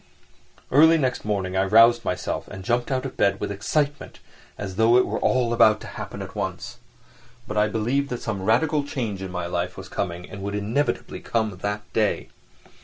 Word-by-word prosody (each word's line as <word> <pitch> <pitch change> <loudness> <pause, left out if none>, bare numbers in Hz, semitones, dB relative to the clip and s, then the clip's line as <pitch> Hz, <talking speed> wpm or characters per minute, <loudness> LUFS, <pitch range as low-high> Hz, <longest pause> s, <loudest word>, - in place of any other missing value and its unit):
Early 160 +4 +7
next 130 -7 -1
morning 95 -3 -1
I 95 - +3
roused 115 +4 +6
myself - - -3
and 95 - -9
jumped 120 +3 0
out 130 0 -1
of 135 - -6
bed 100 0 +2
with - - -3
excitement, 140 +9 -2 0.4
as 95 -3 -5
though 115 +3 +5
it 125 - +4
were - - -2
all 125 -2 +2
about 110 -2 +5
to - - -9
happen - - -6
at - - -10
once. - - -4 0.7
But 105 - -5
I 105 0 +3
believed 120 +6 0
that 125 - -3
some 105 -4 -3
radical 145 +9 +2
change 115 -9 -4
in 95 - -5
my 90 -1 -3
life 90 +1 -3
was 95 0 -9
coming, 90 -1 -4
and 100 - -9
would 100 +1 -3
inevitably 110 +8 -1
come 110 -4 -1
that 105 +2 -3
day. 110 -2 0
110 Hz, 190 wpm, -24 LUFS, 95-125 Hz, 0.7 s, Early